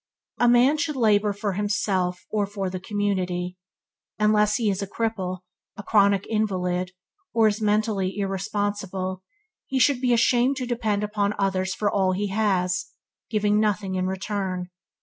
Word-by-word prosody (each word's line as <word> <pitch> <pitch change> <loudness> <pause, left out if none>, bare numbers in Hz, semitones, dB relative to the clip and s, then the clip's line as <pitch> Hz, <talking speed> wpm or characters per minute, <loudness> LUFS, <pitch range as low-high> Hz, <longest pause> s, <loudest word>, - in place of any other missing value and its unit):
A 240 - +5
man 250 +5 +4
should 300 0 -1
labour 210 -4 +3
for 205 0 -3
himself 190 -3 -1
or 210 -2 0
for 195 -2 -4
the 185 - -4
community. 185 -3 -2 0.6
Unless 210 0 +3
he 230 - 0
is 195 0 -3
a 200 - -3
cripple, 195 -4 -3 0.4
a 205 - -7
chronic 200 -2 +3
invalid, 185 -4 -1 0.4
or 225 -1 +5
is 215 +1 -1
mentally 210 -2 0
irresponsible, 195 -1 -2 0.5
he 270 - -1
should 260 -1 +3
be 250 -2 +2
ashamed 240 +3 +3
to 255 - -2
depend 225 -4 -1
upon 210 -1 -1
others 190 -1 0
for 210 - -1
all 190 -2 +2
he 200 +2 -2
has, 190 -3 0 0.4
giving 210 -1 +2
nothing 205 -2 0
in 185 0 0
return. 190 -1 -3
205 Hz, 150 wpm, -24 LUFS, 190-215 Hz, 0.6 s, A